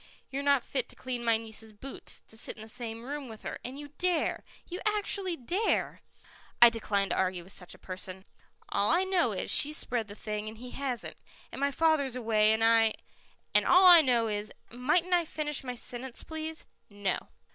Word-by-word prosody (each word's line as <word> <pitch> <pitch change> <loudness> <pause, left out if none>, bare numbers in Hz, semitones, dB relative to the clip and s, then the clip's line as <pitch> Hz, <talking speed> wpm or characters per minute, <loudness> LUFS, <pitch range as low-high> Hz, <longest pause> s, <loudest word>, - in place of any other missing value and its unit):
You're 275 +1 -2
not 280 -3 +3
fit 260 -3 -3
to - - -10
clean 250 -2 -5
my 230 -1 +3
niece's 220 -1 -5
boots, 265 +6 -6
to - - -13
sit 220 - -3
in 215 - -10
the - - -11
same 225 0 -5
room 285 +1 -5
with 220 -1 -11
her, - - -5
and 255 +3 -6
you 290 0 -8
dare 355 -3 0 0.2
you 360 +1 -5
actually 405 -3 0
dare 350 - -1 0.6
I 240 0 +9
decline 205 -3 -1
to - - 0
argue 185 -2 0
with 190 +3 -10
such 180 - -6
a - - -16
person." 185 0 -5 0.4
"All 200 +1 +1
I 350 +3 +4
know 375 -2 +2
is, - - -2
she's 300 +1 +5
spread 235 -3 +1
the 205 - -10
thing 210 0 -4
and 220 - -11
he 250 +2 -9
hasn't, 265 -4 -2 0.3
and - - -7
my 280 - +3
father's 285 -3 +2
away 220 -3 +3
and 220 +1 +1
I 225 -1 +4 0.3
" - - -35
"And - - +4
all 365 +1 +6
that 355 -1 +11
I - - +8
know 240 -5 +2
is 210 0 -3 0.2
" - - -35
"Might 255 +8 +2
I 350 -1 +4
finish 300 -3 -1
my 250 -1 -4
sentence, 245 +1 -5
please?" 320 0 -5 0.2
"No." 205 -2 -3
245 Hz, 210 wpm, -30 LUFS, 220-300 Hz, 0.6 s, that